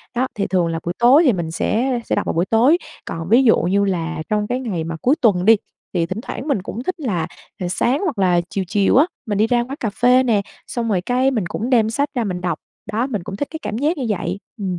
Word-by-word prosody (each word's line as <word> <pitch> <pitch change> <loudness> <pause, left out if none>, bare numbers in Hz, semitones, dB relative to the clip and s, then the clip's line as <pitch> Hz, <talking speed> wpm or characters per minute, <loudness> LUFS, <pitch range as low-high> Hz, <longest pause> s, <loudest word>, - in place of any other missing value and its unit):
Đó, 255 +2 +1
thì 200 -3 -1
thường 180 -3 +1
là 165 0 -2
buổi 170 - -1
tối 260 +7 +6
thì 255 - +5
mình 170 -4 -3
sẽ 240 +8 0
sẽ - - 0
đọc - - -1
vào - - -1
buổi 170 +2 +1
tối, 240 - +4 0.3
còn 165 +1 -5
ví 245 +5 +6
dụ 225 - +5
như 200 +3 +1
là 170 -4 -2
trong 210 -1 0
cái 250 +3 -1
ngày 200 -10 -3
mà 165 0 -4
cuối 270 +5 +3
tuần 185 -6 +3
đi 225 +2 +8 0.4
thì 170 -2 +1
thỉnh 190 +6 -5
thoảng 265 - -6
mình 275 -10 +1
cũng 225 +6 -6
thích 370 +3 -3
là 180 - -1 0.4
sáng 245 +9 +1
hoặc 310 - -1
là 180 -2 +3
chiều 195 - -2
chiều 205 0 +2
á 285 - +6 0.2
mình 205 -3 -2
đi 215 - +3
ra 240 +1 +2
quán 260 +3 -6
cà 225 - -1
phê 250 +4 +4
nè, 225 -5 +2 0.3
xong 235 -2 -2
rồi 190 -4 +1
cái 255 +6 +1
mình 220 -7 -1
cũng 220 +7 -3
đem 230 -4 +3
sách 280 +6 0
ra 240 - +1
mình 180 -4 -3
đọc. 175 -3 -2 0.3
Đó, 235 +4 0
mình 210 -9 -3
cũng 195 - -6
thích 280 +8 -3
cái 320 - -6
cảm 210 - -4
giác 300 +7 0
như 265 - -2
vậy. 185 -2 -2 0.2
Ừ. 200 - -5
220 Hz, 270 wpm, -20 LUFS, 180-250 Hz, 0.4 s, đi